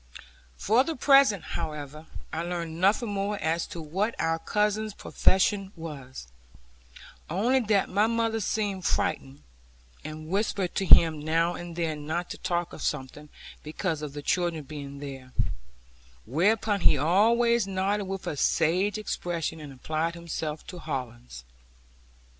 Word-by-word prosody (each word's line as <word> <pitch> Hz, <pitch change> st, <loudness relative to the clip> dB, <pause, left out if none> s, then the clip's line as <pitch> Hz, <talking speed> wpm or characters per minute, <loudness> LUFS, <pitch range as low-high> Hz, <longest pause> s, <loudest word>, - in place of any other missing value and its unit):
For 225 Hz, +5 st, +3 dB
the 325 Hz, +2 st, -3 dB
present, 275 Hz, -, +5 dB
however, 150 Hz, -1 st, -6 dB, 0.3 s
I 160 Hz, -, -1 dB
learned 170 Hz, -1 st, -4 dB
nothing 210 Hz, +4 st, +3 dB
more 205 Hz, +1 st, -1 dB
as 165 Hz, 0 st, -1 dB
to 170 Hz, -, -7 dB
what 190 Hz, +9 st, -2 dB
our 165 Hz, 0 st, +1 dB
cousin's 210 Hz, +2 st, 0 dB
profession 195 Hz, +1 st, +1 dB
was; 140 Hz, -, -8 dB, 1.0 s
only 230 Hz, +11 st, +2 dB
that 210 Hz, -5 st, +2 dB
mother 225 Hz, +3 st, +1 dB
seemed 205 Hz, -3 st, -1 dB
frightened, 65 Hz, -, -1 dB, 0.6 s
and 155 Hz, +1 st, -7 dB
whispered 195 Hz, 0 st, -1 dB
to 195 Hz, -, -1 dB
him 160 Hz, -3 st, +7 dB
now 165 Hz, +3 st, +1 dB
and 175 Hz, -1 st, -7 dB
then 155 Hz, -3 st, -3 dB
not 170 Hz, +3 st, -2 dB
to -, -, -7 dB
talk 175 Hz, -1 st, -2 dB
of -, -, -9 dB
something, 145 Hz, +3 st, -4 dB, 0.3 s
because 155 Hz, +1 st, -3 dB
of 150 Hz, -2 st, -5 dB
the 145 Hz, 0 st, -7 dB
children 170 Hz, -3 st, 0 dB
being 140 Hz, -1 st, -8 dB
there; 135 Hz, -3 st, -8 dB, 0.9 s
whereupon 200 Hz, -, +1 dB
he -, -, +5 dB
always 225 Hz, +7 st, +3 dB
nodded 195 Hz, +2 st, 0 dB
with 195 Hz, 0 st, -5 dB
a -, -, -2 dB
sage 180 Hz, +8 st, +2 dB
expression, 175 Hz, -6 st, -3 dB
and 150 Hz, -2 st, -9 dB
applied 155 Hz, +5 st, -2 dB
himself 160 Hz, -2 st, -5 dB
to 180 Hz, -, -8 dB
hollands. 125 Hz, -, -6 dB
170 Hz, 135 wpm, -27 LUFS, 155-205 Hz, 1.0 s, him